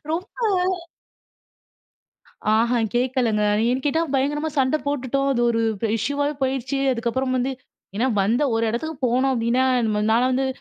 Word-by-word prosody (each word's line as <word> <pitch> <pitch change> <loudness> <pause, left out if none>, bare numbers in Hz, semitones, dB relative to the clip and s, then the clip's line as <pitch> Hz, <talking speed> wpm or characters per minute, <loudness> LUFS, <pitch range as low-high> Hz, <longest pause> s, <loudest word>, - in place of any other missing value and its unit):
ரொம்ப 350 +3 -3 2.2
ஆஹா! 235 +2 +2 0.2
கேட்கலங்க. 245 -3 +1 0.3
ஏன்னு 255 +2 0
கேட்டா 320 +3 +1
பயங்கரமா 295 +3 0
சண்டை 265 +3 +2
போட்டுட்டோம். 275 0 -1
அது 240 - 0
ஒரு 230 -1 0 0.4
இஷ்யூவாவே 285 +6 -1
போயிடுச்சு. 265 +1 -1
அதுக்கப்புறம் 255 +2 -1
வந்து 255 +2 0 0.5
ஏன்னா, 245 +4 +1
வந்த 225 +8 +1
ஒரு 225 0 +1
இடத்துக்கு 300 +7 -3
போனோம் 255 +3 +2
அப்பிடின்னா, 240 +1 +1 0.2
நம்ம 210 -1 0
நான்லாம் 245 +3 +3
வந்து 265 +1 +1
255 Hz, 130 wpm, -22 LUFS, 235-275 Hz, 2.2 s, நான்லாம்